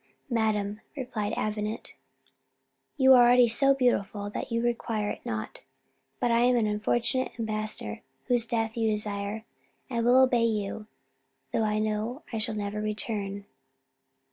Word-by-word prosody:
"Madam," 215 -2 0 0.2
replied 220 -6 -3
Avenant, 215 +1 -3 1.0
"you 265 0 +7
are 250 - +8
already 245 0 +6
so 275 +4 +5
beautiful 205 -5 0
that - - -5
you 230 - +1
require 230 -3 -1
it - - -8
not; 110 -1 -5 0.6
but 240 - +1
I 230 - +4
am 245 +1 +4
an 235 -3 +2
unfortunate 225 +4 0
ambassador 215 - -3 0.2
whose 240 -2 +1
death 225 -1 -1
you 225 -1 +1
desire: 210 0 -3 0.5
I 235 -1 0
will 245 +2 +5
obey 250 -3 +4
you, 210 -1 -2 0.7
though 225 - +1
I 210 0 0
know 215 +5 -2
I 225 - -1
shall 220 0 -1
never 205 0 -3
return." 205 -1 -3
220 Hz, 140 wpm, -28 LUFS, 210-240 Hz, 1.0 s, are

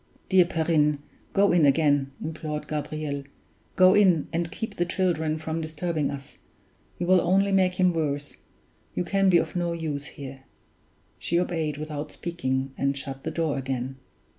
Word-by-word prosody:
"Dear 185 -2 +6
Perrine! 160 -3 +2 0.3
go 200 0 +4
in 175 -2 +4
again," 145 -1 +3
implored 155 -1 -4
Gabriel. 150 -1 -3 0.5
"Go 185 0 +7
in, 185 -7 +4
and 170 0 -1
keep 220 -2 -5
the 175 - +2
children 170 -4 0
from 160 +1 -3
disturbing 155 -1 -2
us. 140 -1 -8 0.6
You 175 - -2
will 185 0 +5
only 195 +3 +3
make 185 -2 +3
him 185 -1 +3
worse 145 -3 -2 0.6
you - - 0
can 195 +1 +2
be 175 - +6
of 160 0 -1
no 175 -1 0
use 155 -4 -3
here!" 135 -2 -9 0.7
She 170 - +1
obeyed 160 -5 -1
without 150 -1 -5
speaking, 135 -6 -2
and 140 0 +1
shut 135 -1 -5
the - - -2
door 160 -4 -1
again. 130 0 -3
160 Hz, 160 wpm, -26 LUFS, 145-175 Hz, 0.7 s, Go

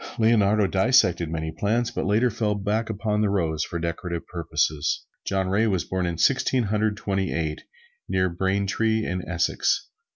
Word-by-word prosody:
Leonardo 110 -2 +3
dissected 95 -5 +3
many 80 0 -3
plants, 115 +7 0
but - - -3
later 115 +5 +3
fell 105 0 -1
back 105 +3 -1
upon 105 0 -1
the 105 - +2
rose 80 -5 0
for 85 - -4
decorative 85 0 -4
purposes. 80 -3 -1 0.2
John 95 -1 0
Ray 105 +4 +2
was 95 -5 0
born 95 -1 -1
in 85 -1 -3
Sixteen 130 +3 +2
Hundred 105 0 0
Twenty 95 -2 -1
eight 80 -2 -2 0.5
near 95 0 +2
Braintree 100 +5 0
in 90 +1 -2
Essex. 85 -1 0
95 Hz, 160 wpm, -25 LUFS, 85-110 Hz, 0.5 s, Leonardo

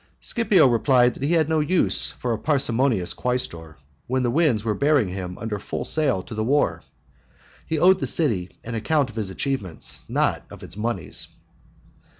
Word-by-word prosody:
Scipio 210 - +2
replied 125 +1 +3
that - - -13
he 145 +5 0
had 160 -3 +2
no 160 -1 +1
use 170 +4 +4
for 120 -2 -4
a - - -2
parsimonious 125 - +2
quaestor 85 - -4 0.3
when 130 +1 0
the 120 - 0
winds 145 -8 +1
were 110 -2 0
bearing 140 -2 +2
him 90 -1 -6
under 110 -2 -4
full - - -5
sail 135 -12 +1
to - - -10
the 110 0 -2
war; 140 +6 +1 0.9
he 160 - -1
owed 185 +4 +4
the - - -2
city 110 - 0
an 115 - -6
account 135 +3 0
of - - -20
his 105 -4 -3
achievements, 100 - -4
not - - 0
of - - -12
its - - -7
moneys. 105 -8 -3
125 Hz, 175 wpm, -23 LUFS, 105-150 Hz, 0.9 s, use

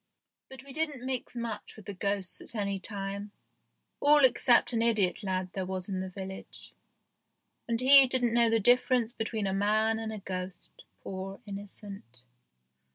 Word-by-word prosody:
But 265 -1 -11
we 275 -1 -12
didn't 295 -4 -3
mix 255 -2 -4
much 235 -2 -5
with 215 - -14
the 205 - -6
ghosts 200 0 -2
at - - -7
any 200 -2 -2
time, 200 0 -5 0.7
all 290 -1 +6
except 245 -1 +4
an 225 - +1
idiot 215 -5 +1
lad 185 -2 -3
there 190 - -3
was 185 0 -4
in 190 -1 -2
the 190 0 -4
village, 190 0 -9 0.9
and 230 -1 -1
he 270 +1 +9
didn't 245 -2 +1
know 235 -1 +4
the 225 0 +3
difference 245 +1 +3
between 220 -3 -3
a 190 - -1
man 215 +3 +1
and 220 -1 -4
a 215 - -5
ghost, 185 -2 -6 0.3
poor 195 +1 -6
innocent 195 - -9
210 Hz, 160 wpm, -29 LUFS, 195-240 Hz, 0.9 s, he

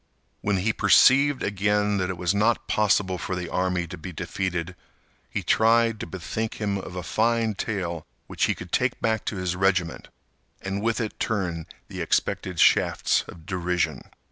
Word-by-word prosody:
When 100 -1 +1
he 110 +5 +1
perceived 130 +7 +5
again 105 0 +1
that 90 -1 -1
it 95 - -4
was 90 +1 0
not 110 +3 +1
possible 100 -3 +1
for 90 - -3
the 90 -1 -4
army 90 -1 0
to 90 +1 -9
be 90 - -7
defeated, 90 +1 -3 0.5
he - - -3
tried 115 0 +3
to - - -5
bethink 105 +5 -4
him 100 -2 -2
of 90 -1 -8
a 90 - -4
fine 115 +1 +1
tale 90 -6 -4 0.2
which - - 0
he - - 0
could - - -10
take - - +1
back 110 -2 0
to - - -2
his 90 -1 -2
regiment, 95 -2 0 0.5
and 95 +1 -4
with 115 +1 0
it 110 -2 -4
turn 90 -7 -2 0.2
the - - -6
expected 90 -3 -1
shafts - - +3
of 80 -2 -12
derision. 90 -2 -1
95 Hz, 170 wpm, -25 LUFS, 90-110 Hz, 0.5 s, perceived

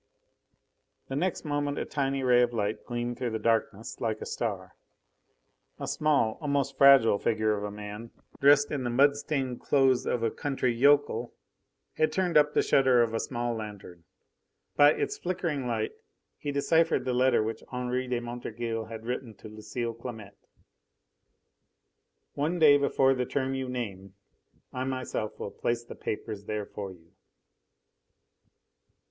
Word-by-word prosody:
The 135 - -3
next 175 +3 -1
moment 145 -1 -1
a - - -2
tiny 135 -1 -1
ray 125 -1 +5
of 120 0 +1
light 105 -1 -2
gleamed 120 0 -3
through 125 -2 -1
the 110 - -2
darkness 110 -1 -1
like 110 -2 -1
a - - -6
star. 95 -6 -4 1.0
A - - -4
small, 145 -8 +1
almost 140 -2 -1
fragile, 135 -7 +6
figure 110 -1 +1
of 100 - -5
a 105 - -3
man, 105 +2 -8 0.3
dressed 145 +1 +5
in 140 -3 -2
the 120 - -1
mud 140 +4 +4
stained 135 -4 -3
clothes 135 -3 +2
of 120 - 0
a 115 - +1
country 135 -4 -1
yokel, 140 -1 +2 0.6
had 155 0 +2
turned 180 +1 0
up 150 0 +4
the - - +4
shutter 130 -3 +4
of 115 -1 -2
a 115 - 0
small 120 -1 -2
lanthorn. 100 -6 -8 0.7
By 145 +1 +7
its - - -3
flickering 170 -7 -2
light 110 -2 -1 0.5
he 145 - -3
deciphered 140 -1 +2
the 130 - 0
letter 125 -2 +3
which 110 +1 -4
Henri 125 0 -2
de 125 -1 -1
Montorgueil 120 -1 -4
had 110 0 -9
written 125 -2 -4
to 105 - -12
Lucile 110 +2 -5
Clamette. 110 -4 -10 1.9
"One 155 +5 -1
day 145 -3 +6
before 135 -1 +3
the 125 -1 -2
term 135 -1 -1
you 130 -1 -3
name 100 -6 -5 0.6
I 130 - -2
myself 130 -5 -3
will 100 - -5
place 120 0 -2
the 120 - -10
papers 105 -1 -5
there 105 -1 -3
for 100 -2 -7
you." 85 -2 -18
125 Hz, 155 wpm, -28 LUFS, 110-140 Hz, 1.9 s, By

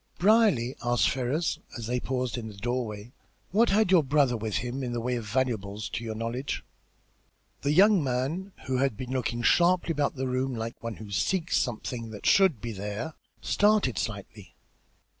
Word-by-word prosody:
"Brierly," 195 - +4
asked 120 -7 +2
Ferrars, 135 +6 -1 0.2
as 115 - -5
they 125 +2 -1
paused 125 -2 -2
in 120 -3 -5
the 105 - -9
doorway, 115 -1 -3 0.4
"what 225 +5 +4
had 210 -1 +3
your 180 -3 +7
brother 140 -2 +2
with 110 -2 -3
him 125 +2 -2
in 125 -2 -3
the 120 - -1
way 125 +2 -1
of 115 -3 -5
valuables, 105 -4 -1
to 115 - -4
your 110 -1 -4
knowledge?" 115 +4 -3 1.0
The 140 - +1
young 195 +2 +5
man, 140 +10 -2
who 130 -1 0
had 135 -4 +1
been 130 +2 -6
looking 120 -2 -1
sharply 175 +2 +4
about 145 -2 0
the 130 0 -2
room 130 0 -1
like 115 0 -5
one 115 -1 -4
who 105 -2 -10
seeks 160 - +1
something 115 0 -3
which 105 -2 -9
should 190 - +5
be 115 +2 -5
there, 105 +9 -5 0.3
started 205 - +2
slightly. 100 -2 -6
125 Hz, 180 wpm, -28 LUFS, 115-145 Hz, 1.0 s, your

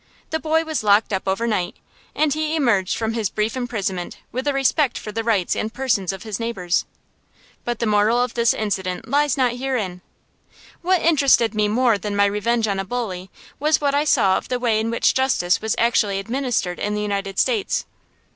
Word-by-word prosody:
The 320 - 0
boy 320 +1 +1
was 315 -6 -3
locked 205 +1 +3
up 190 0 -2
overnight, 195 -2 -1 0.4
and 305 -2 +2
he 310 +1 -1
emerged 230 - +1
from 225 0 -1
his 225 -4 -1
brief 215 +4 -1
imprisonment 205 -8 -3
with 260 +4 -3
a - - +3
respect 275 0 +1
for 210 - -6
the 225 +2 -3
rights 215 -6 +1
and 215 - -2
persons 225 -8 0
of 190 -1 -8
his 215 -2 -5
neighbors. 195 -7 -1 0.8
But 240 -1 -2
the 235 - -1
moral 210 +2 +3
of 245 -1 0
this 235 -1 +3
incident 190 -3 -3
lies 285 +1 +2
not 250 -2 +1
herein. 230 -9 -3 0.8
What 365 0 +2
interested 275 -8 +4
me 210 -1 +1
more 230 0 +2
than 205 +1 -4
my 200 0 +4
revenge 220 +3 0
on 200 -2 -1
a - - -1
bully 195 -4 -4 0.3
was 305 +2 +2
what 285 -1 0
I 290 +1 +2
saw 190 -9 +3
of - - -7
the 250 - 0
way 230 -3 +1
in 220 +1 -1
which 230 - +2
justice 255 -9 +1
was 220 -1 -1
actually 220 -4 +2
administered 230 -4 -2
in 210 0 -1
the 210 - -2
United 200 -1 -3
States. 450 -5 +1
225 Hz, 195 wpm, -21 LUFS, 200-260 Hz, 0.8 s, interested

